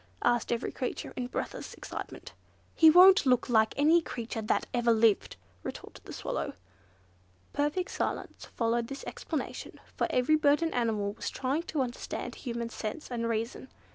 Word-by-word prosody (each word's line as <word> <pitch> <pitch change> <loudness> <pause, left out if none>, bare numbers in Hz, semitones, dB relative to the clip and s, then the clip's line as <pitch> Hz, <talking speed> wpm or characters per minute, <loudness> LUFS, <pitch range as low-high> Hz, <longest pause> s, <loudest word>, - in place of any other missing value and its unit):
asked 240 -1 +2
every 235 +1 -1
creature 255 - -4
in 250 -1 -3
breathless - - -5
excitement. - - -8 0.4
"He 320 - +7
won't 365 -1 +8
look 250 0 +3
like 220 -2 +3
any 315 +4 +5
creature 235 -5 -5
that 215 - 0
ever 240 -1 +3
lived," 220 -2 +3 0.3
retorted - - -8
the - - -9
Swallow. - - -3 1.0
Perfect 295 +6 0
silence - - -3
followed 230 0 0
this 275 +2 -7
explanation, - - -5 0.2
for - - +1
every 255 +5 +3
bird 295 +1 +3
and 325 - -1
animal 215 -4 0
was - - -4
trying 270 +5 -1
to 300 - 0
understand 245 -1 -5
human 235 -3 -4
sense 235 +6 -6
and 230 -1 -1
reason. 230 +3 -3
245 Hz, 155 wpm, -30 LUFS, 230-290 Hz, 1.0 s, won't